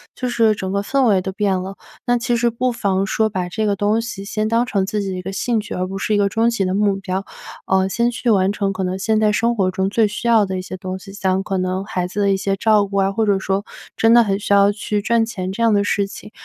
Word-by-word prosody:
就 255 - -3
是 225 -3 +3
整 190 -2 -4
个 200 +1 0
氛 270 +6 0
围 205 -5 +4
都 190 - -4
变 200 -1 0
了。 195 +1 -7 0.3
那 245 -1 +2
其 240 0 0
实 235 0 +2
不 250 +2 -1
妨 195 -4 0
说 220 +2 +1
把 185 -4 -3
这 215 +5 -2
个 205 -1 +1
东 205 +3 +1
西 225 -4 -6
先 215 +1 -2
当 230 +2 +2
成 200 -6 0
自 210 +2 -2
己 195 - -3
的 185 - -4
一 - - -5
个 190 +2 -6
兴 230 +3 0
趣， 210 - -6
而 180 - -2
不 190 +1 -6
是 215 - -1
一 - - +3
个 200 -1 +2
终 225 +3 +2
极 230 -4 -1
的 185 0 -1
目 205 0 +2
标。 195 0 -4 0.4
嗯， 190 0 +2
先 235 +4 +1
去 240 +1 -2
完 195 -3 +3
成 200 -2 -1
可 190 0 -3
能 185 0 -2
现 220 +2 +1
在 215 -1 +3
生 230 +3 +1
活 190 -4 +1
中 190 +1 -1
最 215 +1 +2
需 210 +3 -5
要 225 -3 +5
的 190 -1 -4
一 - - -3
些 185 - -7
东 185 0 -5
西， 195 0 -12
像 190 -2 0
可 195 -1 -3
能 185 +1 -1
孩 180 -2 -2
子 180 +3 -5
的 200 - +2
一 195 - +2
些 195 0 -1
照 215 0 +3
顾 200 0 -4
啊， 195 0 +2
或 220 +2 0
者 200 -2 +2
说 195 +1 -2 0.3
真 225 0 +4
的 235 0 +7
很 195 -2 -1
需 205 -1 0
要 200 0 +5
去 210 0 -2
赚 230 +2 +2
钱 190 -5 -5
这 230 +4 -2
样 225 -2 +4
的 200 - +3
事 205 0 0
情。 205 +1 -11
200 Hz, 315 characters per minute, -20 LUFS, 190-220 Hz, 0.4 s, 的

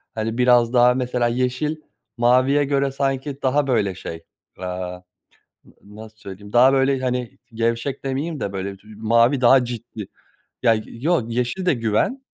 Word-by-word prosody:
hani 110 +1 -3
biraz 125 -1 +4
daha 125 0 +5
mesela 125 -1 -1
yeşil 125 +5 -1 0.4
maviye 130 +4 +3
göre 140 -1 0
sanki 135 0 -3
daha 140 +2 +1
böyle 105 -7 0
şey, 85 -2 -8 0.4
aaa, 90 0 -5 0.7
n - - -20 0.3
nasıl 110 0 -13
söyleyeyim 100 -1 -11
daha 125 +3 +6
böyle 135 0 +2
hani 125 -2 -3 0.2
gevşek 115 +4 -2
demeyeyim 140 +4 -3
de 100 - -4
böyle 95 0 -5
dü 105 +1 -15
mavi 115 +4 +2
daha 130 +1 +6
ciddi, 120 -2 -7 0.6
ya 115 -3 +5
yoo 155 +6 -1
yeşil 125 +10 -2
de 175 - +4
güven. 115 - -1
125 Hz, 150 wpm, -21 LUFS, 110-135 Hz, 0.7 s, daha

